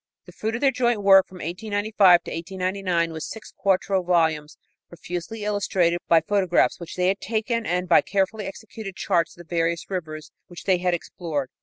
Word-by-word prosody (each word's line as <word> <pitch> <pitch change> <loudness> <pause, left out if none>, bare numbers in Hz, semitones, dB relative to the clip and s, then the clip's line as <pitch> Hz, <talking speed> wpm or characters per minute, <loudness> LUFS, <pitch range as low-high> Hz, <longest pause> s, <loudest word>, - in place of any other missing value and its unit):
The - - -13
fruit 220 +1 -3
of 230 - -4
their 275 -2 +4
joint 240 -4 0
work 195 -1 +7
from 185 - -15
1895 205 +1 +3
to - - -8
1899 185 -1 -2
was 160 -1 -5
six 220 - -10
quarto 195 0 +1
volumes 160 -4 0 0.3
profusely 175 +5 -6
illustrated 190 -4 +1
by 165 -1 +5
photographs 185 0 +1
which 170 -1 -8
they 180 0 +1
had 195 +1 -1
taken 225 +2 -2
and 180 +1 -1
by 175 - +6
carefully 200 +1 -1
executed 200 -1 -8
charts 170 -5 0
of 175 -1 -13
the 175 - -5
various 165 +2 -1
rivers 155 -4 -5 0.2
which 175 - -11
they 185 -2 +2
had 180 -1 +1
explored. 160 -6 -5
185 Hz, 180 wpm, -24 LUFS, 170-205 Hz, 0.3 s, work